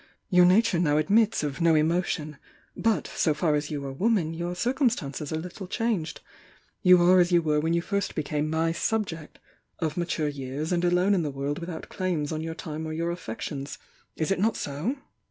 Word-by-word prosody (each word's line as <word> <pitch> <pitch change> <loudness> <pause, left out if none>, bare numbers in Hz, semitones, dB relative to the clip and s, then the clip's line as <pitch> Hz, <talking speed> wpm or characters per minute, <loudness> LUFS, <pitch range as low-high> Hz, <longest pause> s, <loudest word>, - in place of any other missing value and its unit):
Your 180 -1 +7
nature 190 -1 +4
now 150 -4 +2
admits 210 +6 +3
of 145 +1 -3
no 165 -1 +5
emotion. 155 -2 0 0.4
But, 215 -8 +1
so 155 - +1
far 155 0 +1
as 150 0 -1
you 145 -2 -4
are 135 - -4
woman, 185 -1 +1
your 175 +2 -3
cir 240 +8 0
cumstances 165 - -1
are 160 - -1
little 180 +3 -7
changed. 200 - -2 0.6
You 180 0 +7
are 180 +1 +6
as 175 0 +3
you 170 -1 +4
were 150 -1 +2
when 165 +2 +1
you 170 - 0
first 200 0 -2
became 150 0 -1
my 160 +1 +1
'subject' 165 -4 -2 0.2
— - - -48
'of 160 -1 -2
mature 170 -3 -1
years, 145 +2 -4
and 175 -1 +1
alone 180 +3 +3
in 185 - +2
the 155 - -2
world 140 +1 -3
without 170 -1 -7
claims 175 -6 -2
on 155 0 -2
your 160 0 -4
time 160 0 -5
or 155 - -4
your 170 +2 -1
affections.' 140 -2 -6 0.4
Is 160 +3 -1
it 195 - +1
not 220 +3 +1
so?" 150 - -2
165 Hz, 205 wpm, -27 LUFS, 150-180 Hz, 0.6 s, Your